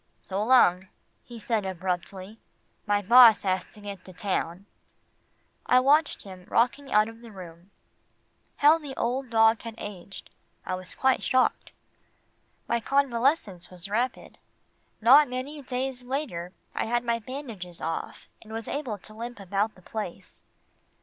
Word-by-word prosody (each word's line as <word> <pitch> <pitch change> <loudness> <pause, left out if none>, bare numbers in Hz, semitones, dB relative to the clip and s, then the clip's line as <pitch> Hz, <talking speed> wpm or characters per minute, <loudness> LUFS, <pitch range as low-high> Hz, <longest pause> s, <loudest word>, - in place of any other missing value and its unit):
"So 195 +2 -3
long," 190 -7 +4 0.4
he 240 - -11
said 225 -1 -1
abruptly. 190 +2 -4 0.5
"My 205 0 +1
boss 235 +1 +8
has 190 -1 0
to 210 - -15
get 200 -3 -8
to 185 - -12
town." 185 -1 -3 1.0
I 250 - +6
watched 290 +4 +3
him 185 -2 -12
rocking 265 +4 +1
out 215 +1 +4
of 225 0 -11
the 235 -2 -12
room. 175 -2 -12 0.9
How 305 +3 +5
the 285 -4 -8
old 250 +2 -2
dog 225 0 +4
had 230 -1 -8
aged. 195 -3 -9 0.3
I - - -3
was 185 0 -7
quite 265 -1 +2
shocked. 255 0 +1 1.0
My 235 - +1
convalescence 250 - 0
was 180 +2 -11
rapid. 240 +4 -2 0.6
Not 270 +5 +7
many 265 +4 -5
days 255 0 -3
later, 245 - -4 0.2
I - - -1
had 240 +1 0
my 235 -1 0
bandages 220 - -8
off, 165 - -5
and 220 - -14
was 225 0 -5
able 260 -8 -3
to 215 +2 -13
limp 235 +1 -7
about 200 +3 -1
the 185 - -19
place. 210 -4 -7
225 Hz, 145 wpm, -27 LUFS, 190-255 Hz, 1.0 s, boss